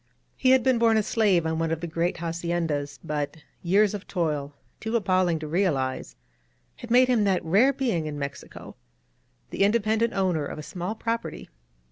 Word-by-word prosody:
He 260 - +1
had 260 -2 +5
been 255 -2 +3
born 225 -1 +4
a 215 - +2
slave 200 -7 +2
on 160 0 -1
one 165 0 0
of 165 -1 -1
the 170 - -4
great 170 +1 -1
haciendas; 165 -3 -2
but 150 0 -3 0.2
years 200 +4 +3
of 205 -2 -6
toil, 150 -5 -2 0.2
too 220 +1 -3
appalling 185 -5 +2
to 155 0 -6
realize, 140 - -1 0.6
had 240 - -10
made 250 +2 +5
him 240 -4 +2
that 190 -4 +1
rare 205 +12 +4
being 235 - -1
in 150 -1 -5
Mexico, 140 -1 -7 0.8
the - - -4
independent 220 +2 +2
owner 185 -6 0
of 140 - -6
a 155 - -7
small 180 +6 -5
property. 230 +1 -4
180 Hz, 175 wpm, -26 LUFS, 160-220 Hz, 0.8 s, had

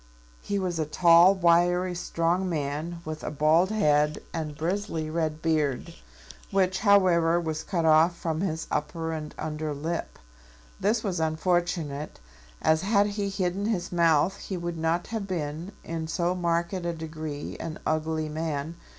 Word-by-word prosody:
He 200 - -2
was 180 -4 -2
a 155 - 0
tall, 170 +4 +6
wiry, 175 +1 +3
strong 175 +1 0
man, 155 +2 -3
with 155 0 -6
a - - -2
bald 155 +5 +3
head 150 -8 +2 0.2
and 155 -3 -4
bristly 165 -2 -2
red 160 -1 -2
beard, 155 -5 0 0.6
which, 190 -1 +1
however, 180 -5 +4
was 160 -2 -3
cut 170 -3 -1
off 160 +2 +5
from 160 -1 -2
his 160 -4 -2
upper 160 +2 -2
and 155 -1 -6
under 155 -1 -3
lip. 165 +4 -4 0.6
This 220 +1 +1
was 185 -5 -1
unfortunate, 160 -2 -1 0.4
as 160 0 +3
had 200 +1 +3
he 200 -1 -2
hidden 195 0 -1
his 205 -6 -2
mouth 170 +2 +3
he 190 - -5
would 170 -1 -4
not 165 +2 0
have 215 -3 -2
been 165 0 -4
in 165 -1 -4
so 175 +2 0
marked 170 0 0
a 175 -2 -2
degree 155 -2 -6
an 155 -1 -5
ugly 155 0 -1
man. 155 0 -3
165 Hz, 150 wpm, -27 LUFS, 155-180 Hz, 0.6 s, tall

